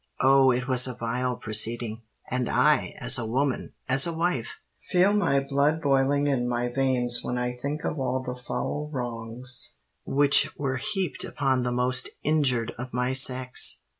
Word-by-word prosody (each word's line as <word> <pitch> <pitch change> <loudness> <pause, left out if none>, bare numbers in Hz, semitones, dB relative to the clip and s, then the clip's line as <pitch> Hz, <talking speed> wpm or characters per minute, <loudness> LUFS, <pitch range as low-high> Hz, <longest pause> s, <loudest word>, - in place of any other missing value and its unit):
Oh! 135 0 +5
it 125 0 0
was 130 -1 +3
a 125 - -5
vile 125 +1 -2
proceeding; 115 +1 -1 0.3
and 125 -1 -1
I, - - +2
as - - +2
a 120 - -3
woman—as 135 +2 0
a 170 - -2
wife, 160 -8 -2 0.2
feel 185 +3 +2
my 200 -9 +2
blood 140 +3 +1
boiling 140 -1 +2
in 130 -4 0
my 120 0 -1
veins 125 -2 +2
when 125 - -3
I 125 0 -2
think 145 +5 -5
of 150 - -3
all 130 0 -1
the 125 -1 -5
foul 145 +4 -4
wrongs 120 -1 -3 0.3
which 140 0 +3
were 135 -2 -2
heaped 185 +7 -2
upon 135 -2 -1
the 125 0 -1
most 125 +1 +1
injured 135 -7 +1
of 125 0 -6
my 125 +1 0
sex!" 130 -1 +2
130 Hz, 165 wpm, -26 LUFS, 125-140 Hz, 0.3 s, Oh